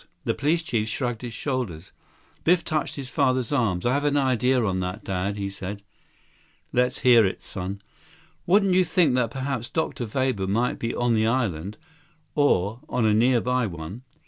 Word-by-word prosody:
The - - 0
police 165 +4 +1
chief 115 -10 -1
shrugged 120 0 -2
his 120 -2 -5
shoulders. 110 - -3 0.5
Biff 170 0 +3
touched 155 -1 -1
his 135 -3 -6
father's 130 -4 +1
arm. 110 -11 +1
"I - - +3
have 140 +1 0
an 145 0 +2
idea 130 -2 +2
on 95 -2 0
that, 90 0 -4
Dad," 95 +2 -2
he 100 -1 -2
said. 100 +1 -6 0.9
"Let's 125 +1 +1
hear 120 -3 +7
it, 95 - -2
son." 95 +2 -6 0.6
"Wouldn't 195 +1 +4
you 185 0 +5
think 165 -4 +2
that 125 -2 +1
perhaps 130 -1 -3
Dr. 160 -7 -2
Weber 130 -7 0
might 115 +6 0
be 115 - -2
on 120 -1 +1
the 110 0 +2
island, 105 -6 -1 0.6
or 110 -7 +2
on 120 - +1
a 110 - +4
nearby 125 +1 +2
one? 85 +5 -7
120 Hz, 170 wpm, -25 LUFS, 100-135 Hz, 0.9 s, hear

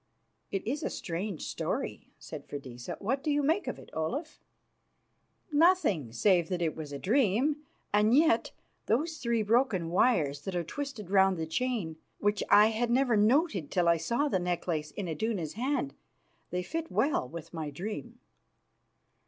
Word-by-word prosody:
"It 195 - -3
is 275 +7 -2
a - - -1
strange 175 0 -4
story," - - -3
said - - -9
Freydisa. 130 -4 -7
"What 260 +7 -1
do 305 - -1
you 290 0 +2
make 320 +8 +1
of - - -3
it, - - -14
Olaf?" 280 - -3 1.1
"Nothing 290 - +3
save 175 - +3
that 180 - -1
it 160 -2 -1
was 155 -2 -7
a 140 - -4
dream. 245 - +2 0.4
And 210 +4 +5
yet 325 +2 +4 0.4
those 310 +8 +1
three 235 -3 0
broken 210 -7 +2
wires 150 - +2
that 190 +4 -5
are 175 - 0
twisted 225 - -6
round 190 -2 +4
the 160 - -2
chain, 175 -2 -2 0.2
which 205 0 +1
I 210 +1 +7
had 230 +2 0
never 250 -1 +3
noted 215 - +2
till 175 -2 +1
I 170 0 +5
saw 235 - 0
the 190 - +1
necklace 175 -3 -2
in 200 -3 -5
Iduna's 170 -1 -2
hand! 275 +4 -1 0.6
They 180 0 -2
fit 325 - -4
well 275 - +1
with 170 0 -9
my 160 -3 -4
dream." 215 - -6
205 Hz, 160 wpm, -30 LUFS, 170-260 Hz, 1.1 s, I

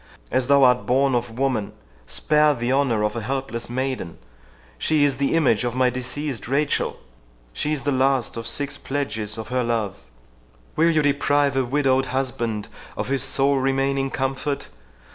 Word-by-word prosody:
—As 130 -1 +1
thou 140 0 +5
art 125 -1 +4
born 135 +1 +3
of 120 -1 -2
woman, 130 -6 -1 0.3
spare 150 - +3
the 120 +1 -1
honour 130 -6 +2
of 105 +1 -1
a 115 - -2
helpless 120 -1 -3
maiden—She 85 - -3
is 140 -2 +2
the 140 +3 +1
image 130 -9 +3
of 120 0 -2
my 130 -1 +3
deceased 130 0 -4
Rachel, 140 +3 0 0.6
she 150 - -1
is 150 -3 -1
the 145 - 0
last 130 -1 +1
of 115 -1 -5
six 145 +4 -1
pledges 110 -7 -3
of 110 -1 -6
her 125 0 0
love—Will - - -3
you 155 -2 +2
deprive 145 -1 +2
a 135 - +2
widowed 135 0 +1
husband 120 -5 -2 0.3
of - - -3
his 135 -1 0
sole 140 +2 +1
remaining 135 +1 0
comfort? 135 +2 -2
130 Hz, 160 wpm, -23 LUFS, 115-140 Hz, 0.6 s, thou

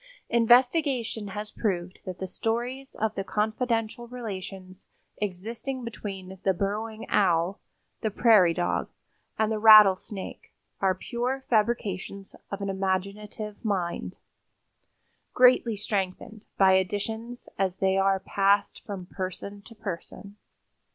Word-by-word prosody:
Investigation 245 -1 +3
has 210 +2 -6
proved 185 -4 -2
that 185 -1 -5
the 190 - -4
stories 240 +7 -3
of 220 -1 -1
the 195 - -3
confidential 225 +3 -1
relations 195 -5 -8 0.3
existing 225 +7 -4
between 195 -5 -7
the 190 -1 +2
Burrowing 215 +4 -3
Owl, 180 0 +2 0.4
the 220 - 0
prairie 205 -6 +5
dog 175 -1 -1 0.5
and 220 0 +1
the 215 - -1
rattlesnake 210 -2 +5 0.2
are 190 -1 +2
pure 250 +7 -3
fabrications 205 -3 -1
of 200 0 -5
an 200 - -2
imaginative 200 +2 -3
mind, 185 -6 -2 1.2
greatly 250 -2 +5
strengthened 205 +1 -3
by 190 -1 +6
additions 220 +5 -2
as 190 -1 0
they 190 0 +2
are 195 0 +3
passed 200 +1 +1
from 195 -3 -6
person 190 +2 -6
to 230 - -13
person. 200 0 -7
205 Hz, 115 wpm, -27 LUFS, 190-225 Hz, 1.2 s, by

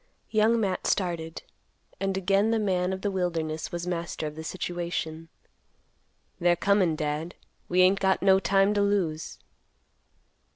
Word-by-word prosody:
Young 220 +1 +3
Matt 195 -4 -1
started, 170 -4 -2 0.6
and 195 -1 -1
again 195 +3 +2
the 230 - +2
man 185 -4 0
of 190 0 -4
the 205 - 0
wilderness 165 -4 -2
was 175 0 -4
master 170 -2 -3
of 150 0 -5
the 160 - -7
situation. 170 -2 -4 1.1
"They're 175 0 +3
comin', 190 -2 +2
Dad. 155 +2 -3 0.3
We 180 +1 +3
ain't 190 +2 +5
got 190 -1 +1
no 190 -1 +6
time 195 +2 +3
to 205 - +1
lose." 185 -6 -1
180 Hz, 140 wpm, -27 LUFS, 165-195 Hz, 1.1 s, no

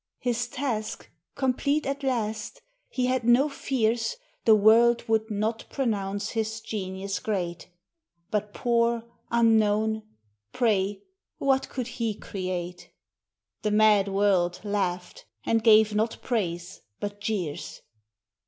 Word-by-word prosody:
His 245 0 -1
task 240 -4 -4 0.2
complete 280 +3 0
at 275 +1 -2
last, 235 - -2 0.3
he 255 - -1
had 255 -1 +1
no 240 +5 +5
fears 245 - 0 0.3
The 220 - +7
world 230 +3 +5
would 220 0 +1
not 215 +2 -2
pronounce 205 -5 -2
his 220 -1 -2
genius 195 -3 -4
great, 180 -5 -3 0.6
But 210 -1 -1
poor, 235 -1 +1 0.3
unknown 220 -2 +3 0.3
— 105 0 -47
pray, 205 -4 +1 0.3
what 270 -1 +1
could 255 -2 -3
he 235 -3 -3
create? 180 -3 -5 0.7
The 210 - 0
mad 210 -1 +4
world 195 -3 +2
laughed, 185 -4 -2 0.2
and 225 -1 +2
gave 215 -1 +6
not 220 +2 0
praise, 175 -7 -2 0.2
but 205 0 -5
jeers. 195 -8 -3
220 Hz, 115 wpm, -27 LUFS, 200-235 Hz, 0.7 s, The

